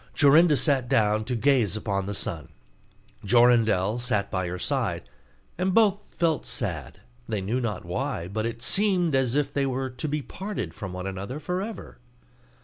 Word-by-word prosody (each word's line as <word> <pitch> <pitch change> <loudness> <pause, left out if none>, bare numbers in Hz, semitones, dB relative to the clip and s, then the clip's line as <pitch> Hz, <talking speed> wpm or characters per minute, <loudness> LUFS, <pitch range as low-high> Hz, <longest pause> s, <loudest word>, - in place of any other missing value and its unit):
Jorinda 150 +2 +6
sat 135 -5 +2
down 110 0 +2
to 125 - -2
gaze 120 -5 +2
upon 100 -3 -2
the 100 - -3
sun; 80 -7 -3 0.8
Jorindel 115 -2 +3
sat 105 -4 0
by 95 -1 -1
her 90 +1 -4
side; - - -2 0.5
and 185 0 0
both 210 -2 +3
felt 165 -4 +1
sad, - - -3 0.3
they 105 - -1
knew 110 +7 -1
not 105 -7 -3
why; 105 -1 -3
but 110 +4 -2
it 115 0 -6
seemed 185 0 +2
as 130 -2 +1
if 145 -1 0
they 140 -1 +1
were 130 0 -2
to 125 +5 -4
be 150 0 -2
parted 200 +8 -5
from 95 -5 -7
one 90 0 -6
another 100 +8 -5
for 180 +4 -2
ever. 220 +2 -8
125 Hz, 170 wpm, -26 LUFS, 105-150 Hz, 0.8 s, Jorinda